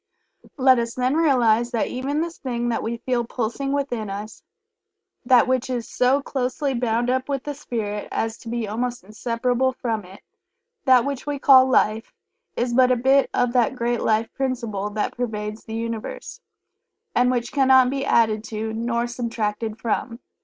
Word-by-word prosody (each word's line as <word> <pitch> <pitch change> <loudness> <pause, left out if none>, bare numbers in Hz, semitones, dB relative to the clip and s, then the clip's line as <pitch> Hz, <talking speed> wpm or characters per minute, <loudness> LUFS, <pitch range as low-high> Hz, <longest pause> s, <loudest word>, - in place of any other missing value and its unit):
Let 260 -2 +5
us 235 0 -3
then 255 +1 +1
realize 240 -7 +3
that 235 -3 0
even 275 +4 -2
this 335 0 -5
thing 240 -3 -2
that 230 - -1
we 235 +1 -3
feel 250 -2 +1
pulsing 240 +4 -3
within 250 -7 -2
us 205 +2 -7 0.8
that 250 -1 +5
which 255 0 0
is 240 -3 -3
so 265 +3 +2
closely 265 +1 -2
bound 240 0 0
up 260 +2 -1
with 275 -2 -2
the 295 - -4
Spirit 215 -7 -4
as 225 0 -2
to 230 - -9
be 235 -2 -2
almost 240 +2 -3
inseparable 245 +5 -1
from 225 -4 -3
it 185 +2 -14 0.6
that 255 -3 +5
which 280 0 -4
we 290 -1 -1
call 265 -1 +6
Life 220 -3 +1 0.4
is 240 0 0
but 255 +1 +5
a - - +4
bit 265 +3 +3
of 245 -1 +1
that 245 0 +2
Great 240 -1 -1
Life 220 +1 +1
Principle 235 -7 -2
that 210 0 -3
pervades 215 -3 -4
the 220 - -6
Universe, 230 - -5 0.7
and 250 +1 +3
which 240 -2 -1
cannot 260 -2 +5
be 275 0 -2
added 220 -5 +2
to, 220 0 -4
nor 235 +1 -1
subtracted 225 -2 -3
from. 230 +1 -2
240 Hz, 170 wpm, -23 LUFS, 225-260 Hz, 0.8 s, call